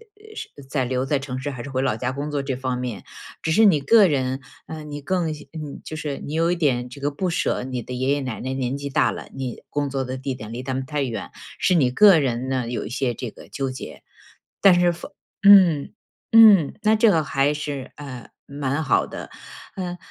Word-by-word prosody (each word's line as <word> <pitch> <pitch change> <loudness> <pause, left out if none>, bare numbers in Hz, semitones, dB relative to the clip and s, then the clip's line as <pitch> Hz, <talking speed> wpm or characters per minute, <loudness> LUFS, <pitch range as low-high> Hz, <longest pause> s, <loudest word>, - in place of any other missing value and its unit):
呃 435 +1 -16
是 - - -6 0.2
在 135 -2 0
留 130 +1 -1
在 140 0 0
城 130 -2 -5
市 145 +2 -4
还 130 -3 -7
是 140 - -7
回 130 -1 -1
老 130 -5 +1
家 125 +3 -2
工 145 +3 -4
作 145 - -1
这 135 -2 -3
方 130 -1 -3
面。 125 -5 -5 0.4
只 160 - 0
是 220 +7 +5
你 175 -7 +5
个 205 +8 +6
人， 130 -3 -1 0.3
呃， 155 -1 -7
你 145 -1 -7
更 175 +3 -1
嗯 - - -3 0.2
你 155 -3 -7
就 155 - -7
是 150 -2 -4
你 150 - -7
有 165 +2 +2
一 180 - +1
点 125 -7 0
这 140 +2 -11
个 145 +1 0
不 180 +6 -2
舍， 165 - -1
你 125 -1 -4
的 125 - -7
爷 130 +2 -1
爷 145 - -1
奶 125 -4 -4
奶 130 +1 -3
年 130 0 -2
纪 140 0 -5
大 145 +2 +2
了， - - -8
你 130 -3 -5
工 145 -1 -1
作 135 -1 -2
的 130 +1 -5
地 135 0 -3
点 110 -3 -8
离 120 +2 -5
他 130 0 -3
们 130 0 -3
太 145 +1 -2
远， 115 -5 -4 0.3
是 185 - +3
你 130 -7 +3
个 195 +6 +7
人 130 -3 -1
呢， 130 -3 -1
有 120 - -3
一 - - -6
些 125 0 -1
这 125 +1 -5
个 - - -15
纠 135 -1 -3
结。 130 - -8 0.6
但 185 -3 +6
是 175 -1 +3
父 170 - -9 0.4
嗯， 185 -8 +7 0.4
嗯， 210 -9 +7
那 215 +1 +4
这 220 -1 +5
个 160 -3 +3
还 135 +2 +1
是， 145 -3 -5
呃， 130 -5 -9 0.2
蛮 140 +1 -2
好 - - +2
的。 - - -8 0.5
呃， 180 -2 -4
140 Hz, 255 characters per minute, -23 LUFS, 130-160 Hz, 0.6 s, 个